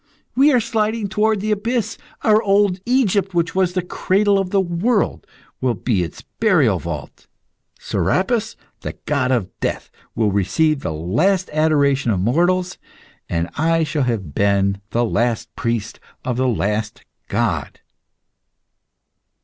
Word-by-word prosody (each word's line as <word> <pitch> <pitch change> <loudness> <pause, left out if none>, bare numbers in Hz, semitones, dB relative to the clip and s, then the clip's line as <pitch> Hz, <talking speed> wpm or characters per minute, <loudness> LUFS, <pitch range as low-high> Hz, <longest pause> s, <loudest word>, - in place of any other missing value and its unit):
we 280 +4 +5
are 250 - +4
sliding 220 -1 -1
toward 210 +1 +1
the 215 +1 -1
abyss. 230 +3 -1 0.3
Our 215 -1 +5
old 200 -2 +2
Egypt, 205 -7 +1
which 170 0 +1
was 185 -2 +1
the 185 -1 -1
cradle 200 +3 +1
of 190 -2 -2
the 195 - +2
world, 190 +5 0 0.3
will 125 -2 +1
be 110 -7 0
its 85 - -6 0.2
burial 155 - +3
vault; 75 -5 -7 0.5
Serapis, 225 +4 0 0.2
the - - -5
god 135 -3 +1
of 115 -8 0
Death, - - -3 0.2
will 110 -3 +1
receive 100 - +1
the 80 - -3
last 155 - 0
adoration 145 -4 +2
of 100 -5 +1
mortals, 175 - +1 0.5
and 85 -1 -1
I 165 +1 +2
shall 150 -1 -1
have 100 - -2
been 100 +1 +1
the 120 +1 +1
last 115 0 -1
priest 115 -2 -2 0.3
of 125 - -1
the 130 +1 +1
last 105 -2 -2 0.2
god. 100 -8 -1
155 Hz, 140 wpm, -20 LUFS, -, 0.5 s, we